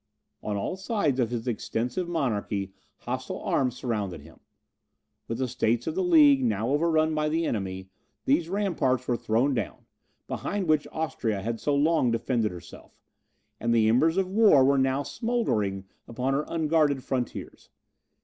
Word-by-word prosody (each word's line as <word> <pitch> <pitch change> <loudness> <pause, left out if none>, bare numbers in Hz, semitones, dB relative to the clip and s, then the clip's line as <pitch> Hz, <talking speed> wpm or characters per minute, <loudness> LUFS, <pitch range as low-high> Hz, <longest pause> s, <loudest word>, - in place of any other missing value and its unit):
On 105 -1 -3
all 180 - -3
sides 190 - 0
of 120 -3 +1
his 120 0 -4
extensive 120 +8 -2
monarchy 105 - -2 0.3
hostile - - -4
arms 125 -2 0
surrounded 105 - -3
him. - - -16 0.9
With 115 - -3
the 130 0 -1
states 120 -1 0
of - - -2
the 380 - -1
League, 295 -6 +6
now 220 - 0
overrun 155 +2 +2
by 150 0 0
the 165 +2 0
enemy, 95 -5 -3 0.4
those 160 +5 +2
ramparts 160 -11 0
were 120 - +1
thrown 120 +5 +1
down, 115 -6 -4 0.4
behind 200 -2 -3
which 155 -2 +2
Austria 115 -10 -2
had 115 +1 -3
so 145 - 0
long 150 -2 +3
defended 115 -1 0
herself, 90 -1 -13 0.6
and 115 +1 +1
the 110 -1 +4
embers 155 +10 +3
of 190 -1 +2
war 195 -9 +5
were 140 0 +3
now 135 +1 +1
smouldering 135 - -1 0.2
upon 125 +3 -2
her 145 +2 0
unguarded 155 -4 +1
frontiers. 125 -3 -4
130 Hz, 155 wpm, -27 LUFS, 115-160 Hz, 0.9 s, League